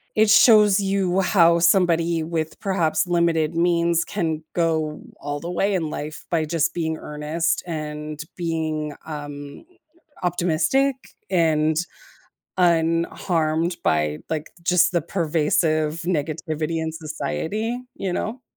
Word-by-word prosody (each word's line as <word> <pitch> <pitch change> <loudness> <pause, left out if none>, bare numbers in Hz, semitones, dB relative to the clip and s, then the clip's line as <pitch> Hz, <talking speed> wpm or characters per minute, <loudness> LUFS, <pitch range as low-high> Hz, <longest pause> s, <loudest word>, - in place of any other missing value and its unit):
it 215 0 +4
shows 210 -2 +6
you 195 -1 +1
how 170 -3 +4
somebody, 170 -2 +3
with 160 -1 -3
perhaps 180 -3 0
limited 170 -2 +1
means, 170 0 +2
can 160 -5 -2
go 160 -3 0 0.2
all 145 0 -4
the 170 +3 -5
way 195 +3 +1
in 165 -4 -1
life 150 +1 -6
by 165 -2 +1
just 165 +1 0
being 160 -2 -2
earnest 150 +3 -2
and 150 -2 -5
being, 160 -3 -2
um, 145 -2 -8 0.6
optimistic, 180 - +1 0.3
and 160 -4 +2 0.8
unharmed 165 -1 +1
by, 75 -1 +1
like, 155 -1 -3
just 180 +1 +3
the 170 - +2
pervasive 155 -1 0
negativity 160 -1 -2
in 160 0 -3
society, 160 - -3 0.2
you 190 -2 -3
know? 235 +7 -3
165 Hz, 115 wpm, -23 LUFS, 155-175 Hz, 0.8 s, shows